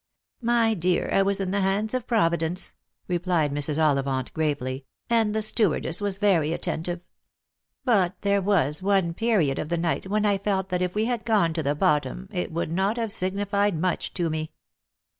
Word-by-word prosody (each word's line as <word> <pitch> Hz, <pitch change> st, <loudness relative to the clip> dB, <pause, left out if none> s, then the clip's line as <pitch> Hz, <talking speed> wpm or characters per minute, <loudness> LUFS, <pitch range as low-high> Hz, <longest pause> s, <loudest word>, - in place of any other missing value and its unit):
"My 230 Hz, -1 st, +3 dB
dear, 180 Hz, -2 st, 0 dB
I 195 Hz, -, +4 dB
was 200 Hz, 0 st, +1 dB
in 190 Hz, -1 st, -2 dB
the 200 Hz, 0 st, +1 dB
hands 200 Hz, +4 st, 0 dB
of 255 Hz, -1 st, -2 dB
Providence," 170 Hz, -5 st, +1 dB, 0.3 s
replied 175 Hz, -4 st, +1 dB
Mrs. 145 Hz, +1 st, -1 dB
Ollivant 135 Hz, -4 st, +1 dB
gravely, 140 Hz, -4 st, -2 dB
" -, -, -52 dB
and 220 Hz, -2 st, +2 dB
the 220 Hz, -, +1 dB
stewardess 205 Hz, -5 st, +1 dB
was 200 Hz, -2 st, -1 dB
very 175 Hz, -7 st, +2 dB
attentive. 170 Hz, +1 st, -3 dB, 0.8 s
But 195 Hz, -7 st, +3 dB
there 200 Hz, -1 st, +2 dB
was 180 Hz, -6 st, +1 dB
one 190 Hz, -3 st, +2 dB
period 190 Hz, -, +1 dB
of 155 Hz, -, -4 dB
the 170 Hz, -, 0 dB
night 170 Hz, +2 st, -1 dB
when 210 Hz, +2 st, +1 dB
I 200 Hz, -1 st, +2 dB
felt 195 Hz, -1 st, -1 dB
that 180 Hz, -1 st, -1 dB
if 180 Hz, +1 st, -1 dB
we 215 Hz, +1 st, +1 dB
had 240 Hz, -2 st, -1 dB
gone 200 Hz, -8 st, +2 dB
to 160 Hz, -, -1 dB
the 145 Hz, 0 st, 0 dB
bottom 150 Hz, +5 st, 0 dB
it 180 Hz, -4 st, -3 dB
would 165 Hz, -1 st, -2 dB
not 195 Hz, +6 st, 0 dB
have 225 Hz, -3 st, -2 dB
signified 200 Hz, -1 st, 0 dB
much 180 Hz, +3 st, -1 dB
to 175 Hz, -2 st, 0 dB
me." 155 Hz, 0 st, -3 dB
185 Hz, 185 wpm, -25 LUFS, 160-205 Hz, 0.8 s, I